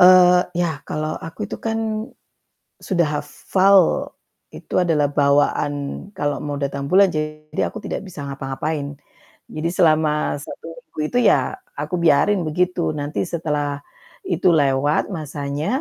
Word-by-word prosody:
Eee, 180 0 +8 0.2
ya 165 -4 -1
kalau 155 0 -2
aku 165 +5 -9
itu - - -6
kan, 225 0 -1 1.0
sudah 175 -4 +1
hafal, 195 +1 +3 0.7
itu - - -10
adalah 155 -4 +2
bawaan 145 0 +2 0.4
kalau 145 -4 0
mau 145 -1 -3
datang 140 0 -2
bulan, 195 +3 +6
jadi 155 -1 -4
aku 215 - -8
tidak - - -3
bisa 180 -4 -10
ngapa-ngapain. 140 +1 -4 0.5
Jadi 155 +2 -2
selama 155 -3 +2
1 145 - -9
minggu 165 - -17
itu 245 - +2
ya 390 - +2 0.2
aku 150 +4 -4
biarin 170 +5 +4
begitu. 180 +3 0
Nanti 145 +3 -2
setelah 150 -4 -2 0.4
itu 180 +1 +1
lewat, 145 +2 +2
masanya 145 -2 -4
155 Hz, 130 wpm, -21 LUFS, 145-175 Hz, 1.0 s, Eee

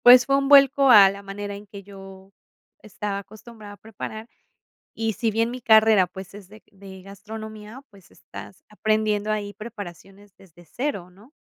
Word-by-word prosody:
Pues, 245 0 +9
fue 275 - +1
un 275 0 0
vuelco 275 -1 +6
a 200 -5 +8
la 200 0 -10
manera 200 +1 -7
en 205 +1 -11
que 200 0 -11
yo 195 0 -14 0.5
estaba 205 -1 -5
acostumbrada 215 +1 -13
a - - -15
preparar. 220 +1 -9 0.7
Y 225 -1 -2
si 225 +1 -2
bien 225 +2 0
mi 250 0 -8
carrera, 220 -3 +5
pues, 190 +1 -11
es 200 -2 -13
de 215 +1 -16
de 195 -1 -13
gastronomía, 215 +4 -10
pues, 200 -4 -21
estás 190 - -13
aprendiendo 215 0 -1
ahí 205 -1 -4
preparaciones 205 -2 -11
desde 175 -2 -20
0, 200 - -5
¿no? 210 - -21
210 Hz, 165 wpm, -23 LUFS, 195-220 Hz, 0.7 s, Pues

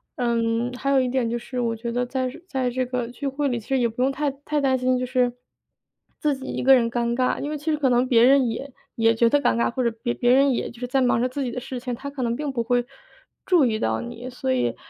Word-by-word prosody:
嗯， 235 0 0
还 275 +2 -3
有 275 - +5
一 255 - 0
点 250 -2 0
就 240 - -1
是 250 +2 -6
我 230 -2 0
觉 235 +1 -5
得 245 +1 0
在 255 +1 -2
这 250 - -11
在 260 -6 -1
这 255 +1 -1
个 250 -1 -3
聚 260 +4 -5
会 280 +1 -1
里， 245 -2 -1
其 215 - -16
实 270 -1 +1
也 240 - +3
不 230 +2 -5
用 270 - +2
太 290 +1 -1
太 290 +2 -3
担 265 -1 +2
心， 255 0 +1
就 255 - -1
是 250 -1 +1 0.9
自 295 -3 +1
己 265 - -9
一 - - -3
个 265 +1 +6
人 235 -2 +2
尴 235 0 -1
尬， 255 0 +1
因 290 - -3
为 305 - -3
其 295 - -14
实 305 - +1
可 280 -3 +2
能 245 +1 +2
别 235 -2 +5
人 265 -1 +5
也 265 +5 -4 0.2
也 225 0 +3
觉 235 +1 +4
得 290 +3 +3
尴 - - +2
尬， 235 - +1
或 255 +1 -2
者 235 - +3
别 240 - 0
别 245 0 +2
人 275 +1 +5
也 - - -2
就 235 - -14
是 250 - -3
在 265 +2 +1
忙 245 -2 +3
着 250 - +1
自 275 +2 -4
己 250 - -3
的 250 - -4
事 250 0 -6
情， 250 0 -4
他 280 +4 -7
可 280 - -6
能 235 -1 0
并 290 +1 -3
不 235 -3 -1
会 245 +1 +1 0.6
注 350 -7 +4
意 220 -3 0
到 110 0 0
你， 235 - -7
所 190 - -2
以， 120 -2 0
250 Hz, 315 characters per minute, -24 LUFS, 235-270 Hz, 0.9 s, 个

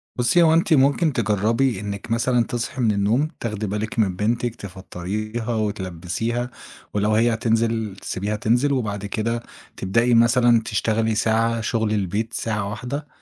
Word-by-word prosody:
بُصّي، 125 +7 +3
هو 160 - +5
أنتِ 165 0 +3
ممكن 145 +3 +3
تجرّبي 115 +2 +1
إنِّك 100 +1 -6
مثلًا 120 +1 +2
تصحي 120 +3 -3
من 110 - +3
النوم 105 +8 +1
تاخدي 105 -2 -3
بالِك 105 +3 -3
من 95 -4 +2
بنتِك 115 +4 -1
تفطّريها 105 +4 -5
وتلبّسيها 105 +3 -2 0.4
ولو 105 +1 +1
هي 115 +2 +3
هتنزل 115 -2 0
تسيبيها 100 +3 -3
تنزل، 120 +6 +2
وبعد 105 -5 -2
كده 115 +3 -2 0.3
تبدئي 115 +6 +2
مثلًا 120 0 +5
تشتغلي 110 +1 0
ساعة 115 +1 +1
شُغل 110 -1 0
البيت 105 +3 -1
ساعة 105 -3 -2
واحدة، 130 +7 -5
115 Hz, 140 wpm, -22 LUFS, 105-120 Hz, 0.4 s, هو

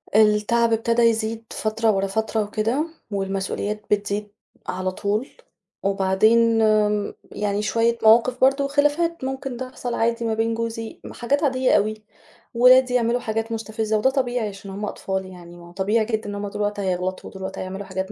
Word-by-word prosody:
التعَب 220 +2 +4
إبتدا 230 +1 +2
يزيد 225 0 +1
فترة 220 +1 +1
ورا 195 -1 0
فترة 220 +2 -1
وكده 225 +9 -1 0.2
والمسؤوليات 195 +1 -2
بتزيد 205 0 -1 0.4
على 185 0 -2
طول، 210 +7 -2 0.5
وبعدين 215 +4 +3
آمم 210 -1 +2 0.2
يعني 205 0 -1
شوية 230 +2 +1
مواقِف 235 +3 +5
برضه 275 +2 +4
وخِلافات 295 +3 +1
ممكن 265 -1 -4
تحصَل 255 -1 -5
عادي 235 0 0
ما 225 - 0
بين 225 +1 0
جوزي، 225 0 -4
م - - -9
حاجات 280 +6 0
عادية 260 -2 +2
أوي، 215 +1 -2 0.5
ولادي 250 +1 +6
يعملوا 240 0 +2
حاجات 225 0 -3
مستفِزّة 220 -1 -1
وده 235 +5 +3
طبيعي 245 -4 -1
عشان 195 0 -10
هُم 205 +2 -4
أطفال 190 -2 -3
يعني، 175 -2 -12
ما 170 0 -13
هو - - -14
طبيعي 205 +5 +1
جدًا 220 -2 -2
إن 205 - -5
هُم 205 0 -4
طُول 205 - -5
الوقت 205 0 -1
هيغلَطوا 185 -1 -2
وطُول 190 - -11
الوقت 190 0 -5
هيعملوا 190 +2 -5
حاجات 190 +1 -4
220 Hz, 170 wpm, -23 LUFS, 200-235 Hz, 0.5 s, ولادي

